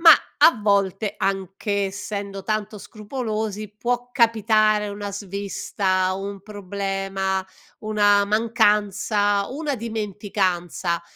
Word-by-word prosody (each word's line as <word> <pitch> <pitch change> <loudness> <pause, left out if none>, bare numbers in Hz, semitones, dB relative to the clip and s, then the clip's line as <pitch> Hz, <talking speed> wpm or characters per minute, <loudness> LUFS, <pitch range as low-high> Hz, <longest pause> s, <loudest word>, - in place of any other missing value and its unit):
ma 330 -1 +10 0.3
a 250 - +6
volte 200 0 +1
anche, 195 +1 -1
essendo 200 0 -5
tanto 215 -1 -2
scrupolosi, 215 -2 -4
può 245 +2 -2
capitare 215 -3 +3
una 205 0 -5
svista, 195 -1 -1
un 195 0 -5
problema, 195 -1 -2 0.4
una 205 -1 +3
mancanza, 210 -1 +2
una 290 +1 -2
dimenticanza. 195 -6 -2
205 Hz, 90 wpm, -23 LUFS, 195-215 Hz, 0.4 s, ma